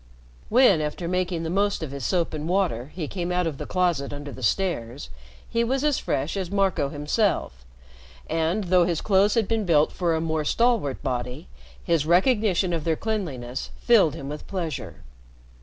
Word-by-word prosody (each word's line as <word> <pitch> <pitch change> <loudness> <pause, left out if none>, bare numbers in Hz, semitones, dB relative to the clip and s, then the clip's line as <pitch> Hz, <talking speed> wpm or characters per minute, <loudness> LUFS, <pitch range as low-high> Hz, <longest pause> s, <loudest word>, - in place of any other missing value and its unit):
When, 225 -9 +5
after 150 +3 -3
making 180 -1 -1
the 165 - -3
most 200 -1 +1
of 150 - -5
his 140 -1 -6
soap 175 +2 0
and 155 +1 -4
water, 165 -9 0
he 165 -5 -3
came 180 0 -3
out 180 0 +1
of 155 -4 -3
the - - -5
closet 175 -7 0
under 145 0 -7
the 130 - -10
stairs, 130 - -1 0.4
he 230 - 0
was 260 +4 0
as 295 -3 +2
fresh 140 +7 -2
as 190 -3 -3
Marco 195 -7 +1
himself; 150 - -1 0.6
and, 165 +6 0
though 180 -1 +4
his 170 -2 0
clothes 200 +1 +3
had 225 -4 +2
been 225 -1 0
built 155 -5 +3
for 170 -3 0
a - - 0
more 160 -1 -1
stalwart 230 - +1
body, 125 +4 -4 0.3
his 165 -3 +1
recognition 190 -1 +3
of 165 -2 -2
their 165 0 +1
cleanliness 150 - -4
filled 215 - +4
him 140 - -7
with 150 +1 -7
pleasure. 155 - -5
170 Hz, 180 wpm, -25 LUFS, 145-195 Hz, 0.6 s, When